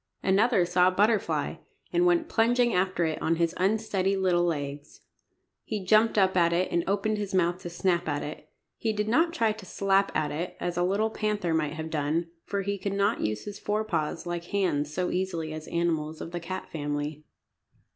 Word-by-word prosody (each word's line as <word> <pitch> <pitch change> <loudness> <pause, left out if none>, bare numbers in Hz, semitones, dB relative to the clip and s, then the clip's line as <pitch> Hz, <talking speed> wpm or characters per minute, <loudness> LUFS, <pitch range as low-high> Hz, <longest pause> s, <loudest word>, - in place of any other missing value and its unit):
Another 195 0 +3
saw 180 +1 +3
a - - +4
butterfly, 210 +3 +1 0.4
and 350 +1 +4
went 340 -2 +3
plunging 240 0 +2
after 180 -1 +1
it 160 -1 -2
on 165 - +2
his 165 0 +1
unsteady 195 -1 +1
little 180 -2 +2
legs. 145 -3 -4 0.6
He 210 -4 -4
jumped 215 +3 +4
up 190 -2 +4
at 170 -2 +4
it, 175 +2 +1
and 170 0 +1
opened 205 +2 0
his 200 -2 -3
mouth 175 0 +1
to 175 - -6
snap 175 -1 0
at 145 0 -1
it. 150 - -8 0.3
He 220 -1 -1
did 210 0 -1
not 325 +9 +3
try 230 -9 +1
to 215 -1 -8
slap 195 +1 +1
at 150 - 0
it, 170 +4 -4
as 175 0 -2
a 175 - 0
little 200 +5 +1
panther 210 -6 -1
might 155 -2 0
have 160 0 -6
done, 160 +3 -1
for 200 -1 -2
he 200 +1 -2
could 200 0 -2
not 200 +3 +1
use 105 0 -2
his 205 0 -7
fore 210 +1 -1
paws 165 -4 -2
like 175 -1 -4
hands 175 -7 0
so 180 +3 -1
easily 170 -4 -2
as 155 0 -7
animals 160 -2 -1
of 165 - -6
the 175 - -3
cat 180 +2 -6
family. 145 0 -3
180 Hz, 200 wpm, -28 LUFS, 165-205 Hz, 0.6 s, a